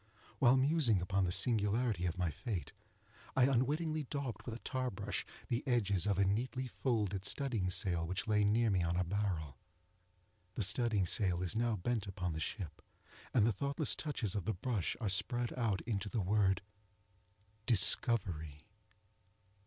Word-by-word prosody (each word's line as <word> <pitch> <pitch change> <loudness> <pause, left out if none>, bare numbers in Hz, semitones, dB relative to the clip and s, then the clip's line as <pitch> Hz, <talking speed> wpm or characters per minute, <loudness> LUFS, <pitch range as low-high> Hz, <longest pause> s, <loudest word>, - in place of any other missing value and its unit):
While 130 +1 +5
musing 135 - +3
upon 95 +2 0
the 90 - -1
singularity 105 -1 +2
of 85 +1 -4
my 90 -3 0
fate, 95 - -5 0.6
I 130 - +4
unwittingly 150 +5 +1
daubed 140 -7 -4
with 115 - -4
a 120 - -12
tar 130 -2 -1
brush 105 -3 -4 0.2
the 120 +1 -1
edges 105 -6 +2
of 100 -3 +1
a 100 - +3
neatly 125 +6 -1
folded 105 -7 -1
studding 115 -6 0
sail 85 -2 +1
which 95 +6 -3
lay 105 -1 +3
near 110 +2 +3
me 95 -2 +2
on 85 0 0
a 90 - +1
barrel. 85 -8 -3 1.0
The 110 - -1
studding 105 -1 +2
sail 90 -1 +1
is 90 - -3
now 115 0 +1
bent 110 +2 -2
upon 90 -3 -3
the 80 - -4
ship, 85 +1 -5 0.5
and 115 -5 +4
the 115 - +3
thoughtless 140 - 0
touches 115 - -3
of 100 -5 -3
the 110 - -1
brush 105 0 -2
are 110 - -2
spread 120 +5 0
out 115 -6 -1
into 105 -3 -3
the 115 - -1
word 95 -1 +2 1.0
DISCOVERY. 95 - +3
105 Hz, 160 wpm, -35 LUFS, 95-120 Hz, 1.0 s, While